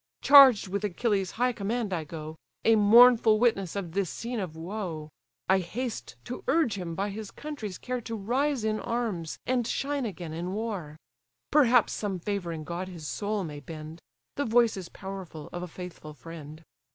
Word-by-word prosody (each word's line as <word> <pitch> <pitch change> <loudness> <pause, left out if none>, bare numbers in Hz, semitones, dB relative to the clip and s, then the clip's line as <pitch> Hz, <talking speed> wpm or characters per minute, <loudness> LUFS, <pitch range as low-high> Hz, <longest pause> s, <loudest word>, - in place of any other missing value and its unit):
Charged 270 -8 +8
with 200 +2 -3
Achilles' 200 -1 0
high 250 +1 +2
command 220 -1 -2
I 165 -3 -2
go, 155 0 -7 0.3
A 225 - +6
mournful 225 +1 +7
witness 200 -7 +1
of 190 -5 -4
this 190 0 -1
scene 235 0 -4
of 180 -5 -4
woe; 165 -3 -5 0.4
I 190 0 +4
haste 230 +7 -5
to 245 - -6
urge 300 -6 +3
him 175 -4 -5
by 200 +3 -2
his 210 0 -6
country's 255 - -6
care 250 -1 -4
To 230 0 -5
rise 250 +5 0
in 215 0 0
arms, 215 -9 -3
and 245 -2 +1
shine 280 -3 -1
again 175 -5 -7
in 175 +3 -4
war. 200 -9 -4 0.5
Perhaps 250 -6 +5
some 200 -3 -2
favouring 175 -4 -3
god 175 +4 -4
his 170 -5 -8
soul 205 +2 -2
may 150 -4 -6
bend; 155 +2 -9 0.4
The 285 - 0
voice 230 0 +4
is 185 -3 -7
powerful 190 -6 -8
of 175 - -4
a 180 - -4
faithful 170 -3 -9
friend." 155 +1 -10
200 Hz, 175 wpm, -28 LUFS, 170-235 Hz, 0.5 s, Charged